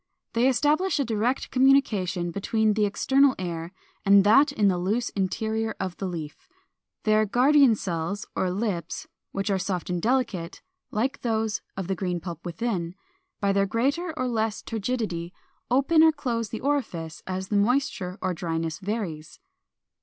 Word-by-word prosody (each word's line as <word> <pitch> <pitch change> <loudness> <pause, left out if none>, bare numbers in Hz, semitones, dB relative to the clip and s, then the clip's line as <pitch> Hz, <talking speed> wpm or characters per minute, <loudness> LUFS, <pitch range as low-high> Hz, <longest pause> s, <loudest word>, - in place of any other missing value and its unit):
They 235 +2 +3
establish 300 +8 +2
a 280 - +1
direct 230 +3 -1
communication 210 -10 +2
between 215 +3 +1
the 210 0 +2
external 270 +6 +3
air 170 -2 -4 0.3
and 200 0 +6
that 275 +8 +5
in 215 -7 +2
the 180 -2 +2
loose 215 +7 0
interior 220 +3 -2
of 185 -2 -3
the 195 - -3
leaf. 160 -4 -7 0.6
Their 215 0 +4
guardian 265 +2 +5
cells 185 0 -3
or 185 - 0
lips, 190 -2 -3 0.3
which 195 +1 -2
are 195 - +1
soft 185 -2 -3
and 175 -1 -1
delicate, 225 -8 -1 0.3
like 245 +6 -1
those 220 -2 -1 0.2
of 190 - -3
the 190 - -1
green 180 -2 -2
pulp 170 -1 -7
within, 175 -1 -3 0.4
by 200 -1 +1
their 200 0 +2
greater 275 - 0
or 255 - 0
less 220 -3 -1
turgidity 210 -6 -3 0.4
open 275 +6 +4
or 320 0 +7
close 240 -7 -3
the 225 - -5
orifice 220 - -2
as 190 0 -4
the 210 - 0
moisture 205 -4 +1
or 185 - 0
dryness 165 -1 -3
varies. 190 - -4
210 Hz, 155 wpm, -26 LUFS, 180-245 Hz, 0.6 s, or